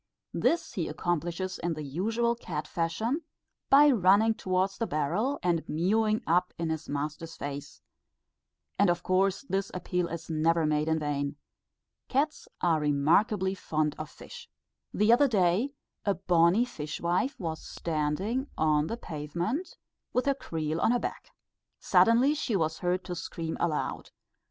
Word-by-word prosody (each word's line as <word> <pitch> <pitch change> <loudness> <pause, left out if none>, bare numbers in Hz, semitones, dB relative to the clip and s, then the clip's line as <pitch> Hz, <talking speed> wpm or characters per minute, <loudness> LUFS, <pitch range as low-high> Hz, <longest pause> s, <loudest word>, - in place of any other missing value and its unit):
This 335 - +1
he 170 -4 -2
accomplishes 175 +3 -2
in 170 -1 -1
the 155 - -5
usual 220 - 0
cat 150 -10 -5
fashion, 220 - -1 0.5
by 290 +1 +7
running 210 0 +4
towards 190 -1 -1
the 230 - 0
barrel 180 - 0
and 170 -2 +1
mewing 215 +7 +1
up 180 +2 +1
in 165 -1 -1
his 160 0 -4
master's 150 +3 -4
face; 145 0 -7 1.0
and 200 -2 +5
of 175 0 0
course 190 +4 +1
this 195 0 -1
appeal 180 0 -1
is 170 -1 -6
never 165 +1 +2
made 150 0 +1
in 160 0 +2
vain. 145 -1 -2 0.7
Cats 290 +4 -1
are 165 -3 +3
remarkably 170 +7 +2
fond 155 -5 -1
of 155 0 -5
fish. 480 -1 -12 0.4
The 210 +3 +4
other 285 +4 +5
day, 210 +5 +2 0.3
a 200 -1 +1
bonnie 180 +4 +3
fishwife 170 - -2
was 160 -4 -4
standing 170 - -2
on 155 -1 +2
the 230 - -3
pavement 170 - -4 0.4
with 250 - +1
her 280 - +3
creel 160 - -3
on - - +3
her 245 - +2
back. - - -5 0.5
Suddenly 240 +5 +4
she 275 -7 -1
was 160 -3 0
heard 180 +1 0
to 185 - -5
scream 165 -1 -4
aloud. 160 -3 -2
175 Hz, 145 wpm, -29 LUFS, 155-220 Hz, 1.0 s, by